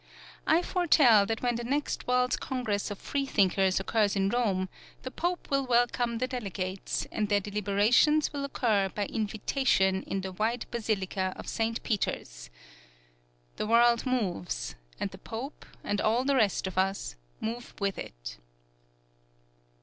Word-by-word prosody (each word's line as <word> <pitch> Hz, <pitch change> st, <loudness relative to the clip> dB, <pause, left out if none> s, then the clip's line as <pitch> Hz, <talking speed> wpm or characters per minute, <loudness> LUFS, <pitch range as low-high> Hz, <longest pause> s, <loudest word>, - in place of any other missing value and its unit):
I 335 Hz, +3 st, +4 dB
foretell 280 Hz, -, +5 dB
that 225 Hz, +1 st, -2 dB
when 240 Hz, -1 st, +1 dB
the 240 Hz, -, -4 dB
next 280 Hz, +5 st, -2 dB
World's 250 Hz, 0 st, +2 dB
Congress 220 Hz, -6 st, -2 dB
of 205 Hz, -, -5 dB
Freethinkers 195 Hz, -10 st, +1 dB
occurs 205 Hz, +1 st, +1 dB
in 195 Hz, 0 st, +2 dB
Rome, 200 Hz, -6 st, +1 dB, 0.4 s
the 260 Hz, -, -5 dB
Pope 350 Hz, +2 st, -3 dB
will 275 Hz, 0 st, +2 dB
welcome 240 Hz, -1 st, +2 dB
the 250 Hz, -, 0 dB
delegates, 195 Hz, -6 st, -3 dB
and 210 Hz, -2 st, -1 dB
their 205 Hz, -1 st, +4 dB
deliberations 210 Hz, +10 st, +2 dB
will 285 Hz, -1 st, -3 dB
occur 220 Hz, -8 st, +1 dB
by 205 Hz, +2 st, -2 dB
invitation 210 Hz, -2 st, +1 dB
in 195 Hz, -, -2 dB
the 190 Hz, 0 st, -5 dB
wide 225 Hz, +6 st, -1 dB
basilica 195 Hz, -5 st, -1 dB
of -, -, -9 dB
Saint 225 Hz, +1 st, -1 dB
Peter's. -, -, -3 dB, 1.1 s
The -, -, -2 dB
world 235 Hz, +2 st, +4 dB
moves, 175 Hz, -, -2 dB, 0.3 s
and 195 Hz, -, -2 dB
the 190 Hz, -, -11 dB
Pope 235 Hz, +8 st, -7 dB, 0.2 s
and 205 Hz, 0 st, -1 dB
all 235 Hz, +4 st, +2 dB
the 280 Hz, 0 st, +2 dB
rest 215 Hz, -7 st, +2 dB
of 185 Hz, 0 st, -2 dB
us 190 Hz, -, -1 dB, 0.2 s
move 235 Hz, +2 st, -5 dB
with 200 Hz, -1 st, -1 dB
it. -, -, -8 dB
220 Hz, 145 wpm, -29 LUFS, 195-250 Hz, 1.1 s, foretell